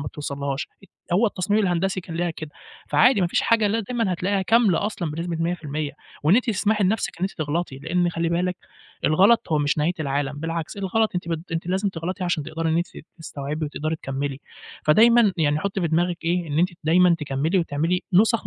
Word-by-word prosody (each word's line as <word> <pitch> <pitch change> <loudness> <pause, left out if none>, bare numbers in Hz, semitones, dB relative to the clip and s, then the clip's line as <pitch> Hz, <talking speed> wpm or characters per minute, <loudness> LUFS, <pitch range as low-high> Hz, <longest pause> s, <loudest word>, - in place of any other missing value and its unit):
ما 140 - -5
يتوصلهاش، 140 -1 -4 0.4
هو 205 +6 +4
التصميم 205 +1 0
الهندسي 185 0 0
كان 165 -2 -8
ليها 175 0 0
كده، 155 -1 -8 0.4
فعادي 245 -4 +4
ما 180 - +3
فيش 170 - +1
حاجة 230 -2 +3
اللي 210 +3 +1
هي 225 - -1
دايمًا 225 -3 -1
هتلاقيها 190 +3 0
كاملة 210 -2 +3
أصلًا 175 -7 -3
بنسبة 165 +2 -3
100%، 155 -4 -2 0.3
وإن 160 +6 +5
أنتِ 245 - +3
تسمحي 210 -1 +1
لنفسِك 200 -2 -1
إن 180 - -8
أنتِ 195 - -1
تغلطي، 155 -2 -3
لإن 175 +4 0
خلّي 165 0 -1
بالِك 180 +2 0 0.5
الغلط 190 +5 +4
هو 155 - +3
مش 145 +1 0
نهاية 155 +4 +2
العالم، 140 -1 -1
بالعكس 165 +2 -4
الغلط 205 +3 +1
أنتِ 175 -1 -3
بت 165 +1 -4
أنتِ 165 +1 -3
لازم 190 +3 0
تغلطي 185 +1 -4
عشان 175 -3 0
تقدري 160 +2 -3
إن 160 - +2
أنتِ 175 +1 0
ت - - -14
تستوعبي 150 0 -5
وتقدري 155 +2 -3
تكمّلي، 135 -1 -4 0.4
فدايمًا 225 +5 +5
يعني 150 -2 +2
حطي 195 +2 -2
في 170 - 0
دماغِك 170 +2 +1
إيه، 175 0 0
إن 145 +2 -1
أنتِ 180 - +4 0.2
دايمًا 175 +2 +5
تكمّلي 150 +5 0
وتعملي 165 +3 0
نُسَخ 220 +3 +3
170 Hz, 200 wpm, -23 LUFS, 155-195 Hz, 0.5 s, وإن